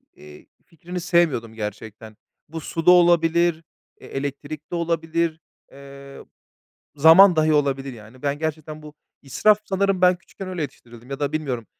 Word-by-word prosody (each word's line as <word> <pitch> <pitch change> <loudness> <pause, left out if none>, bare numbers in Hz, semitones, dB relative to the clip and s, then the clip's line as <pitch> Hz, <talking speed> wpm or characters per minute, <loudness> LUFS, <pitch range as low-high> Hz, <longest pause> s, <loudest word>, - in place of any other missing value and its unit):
eee, 75 0 -15 0.2
fikrini 175 +2 -8
sevmiyordum 160 -10 0
gerçekten. 110 0 -8 0.3
Bu 160 +1 -7
su 165 +2 -5
da 180 - +8
olabilir, 170 -1 +3 0.4
eee, - - -13
elektrik 145 +3 -6
de - - -3
olabilir, 165 -1 -2 0.3
eee, 140 0 -13 0.7
zaman 165 +5 +7
dahi 155 0 +2
olabilir, 140 -2 0
yani. 115 +2 -15
Ben 145 0 -2
gerçekten 155 0 -5
bu 150 -1 -12 0.3
israf 205 +10 +2
sanırım 195 -1 0
ben 180 0 +4
küçükken 185 +2 -11
öyle 180 -3 -4
yetiştirildim. 120 -2 -10
Ya 135 - -5
da 145 0 -2
bilmiyorum 135 -7 -4
155 Hz, 145 wpm, -22 LUFS, 135-170 Hz, 0.7 s, da